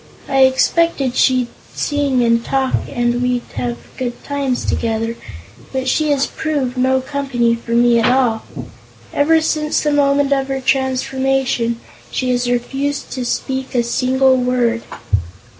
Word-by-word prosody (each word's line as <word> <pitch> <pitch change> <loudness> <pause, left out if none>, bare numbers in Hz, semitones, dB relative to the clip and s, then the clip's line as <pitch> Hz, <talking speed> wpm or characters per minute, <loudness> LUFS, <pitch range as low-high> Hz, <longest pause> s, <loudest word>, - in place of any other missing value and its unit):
I 270 -1 +1
expected 270 0 +2
she'd 255 -2 +3 0.3
sing 285 -4 +1
and 230 0 +2
talk 265 0 0 0.2
and 240 0 0
we'd 250 -1 0
have 240 -1 -2 0.2
good 245 -2 -4
times 280 -3 -2
together; 225 0 -1 0.6
but 265 -1 -2
she 305 +3 +1
has 280 -2 +2
proved 285 -5 -2
no 260 +1 +2
company 265 -4 0
for 235 0 -4
me 240 0 +4
at 230 - +3
all. 245 -4 +2 0.7
Ever 320 +3 +4
since 305 -1 0
the 300 - +1
moment 285 -1 +3
of 270 -1 0
her 270 0 -2
transformation, 265 -2 0 0.3
she 255 0 -1
has 245 0 0
refused 270 +4 -2
to 255 - -3
speak 265 +2 -3
a 240 - +3
single 260 +2 +2
word." 245 -2 +1
260 Hz, 140 wpm, -18 LUFS, 245-275 Hz, 0.7 s, me